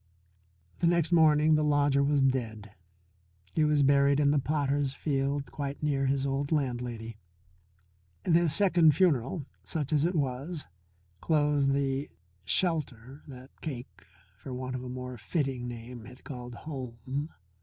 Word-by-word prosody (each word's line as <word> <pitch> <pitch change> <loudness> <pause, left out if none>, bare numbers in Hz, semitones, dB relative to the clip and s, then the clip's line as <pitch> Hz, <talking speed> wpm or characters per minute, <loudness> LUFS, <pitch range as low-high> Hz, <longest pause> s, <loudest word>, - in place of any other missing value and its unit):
The 170 - +2
next 170 -1 +2
morning 155 -2 +5
the 155 0 +3
lodger 145 -1 +3
was 140 0 +2
dead. 115 -6 -1 0.8
He 155 - +2
was 150 -1 +3
buried 140 0 +4
in 145 -1 +4
the 145 - +3
potters' 140 -1 0
field 140 -1 -1
quite 140 0 -5
near 140 -2 +1
his 135 0 0
old 140 +2 -2
landlady. 120 -6 -2 1.1
This 170 -1 +3
second 175 -7 +4
funeral, 150 -3 +1 0.2
such 155 -2 -3
as 150 -1 +3
it 175 +2 +1
was, 145 +3 -2 0.5
closed 145 -3 +2
the 140 0 -1 0.4
shelter 140 - -1
that 130 -1 -13
Cake, 130 -6 -7 0.4
for 130 - -7
want 130 0 -4
of 130 0 -4
a 125 - -6
more 125 -1 -6
fitting 135 -2 -2
name, 120 -1 -8
had 125 +1 -14
called 125 -3 -8
home. 130 0 -5
140 Hz, 140 wpm, -29 LUFS, 130-150 Hz, 1.1 s, morning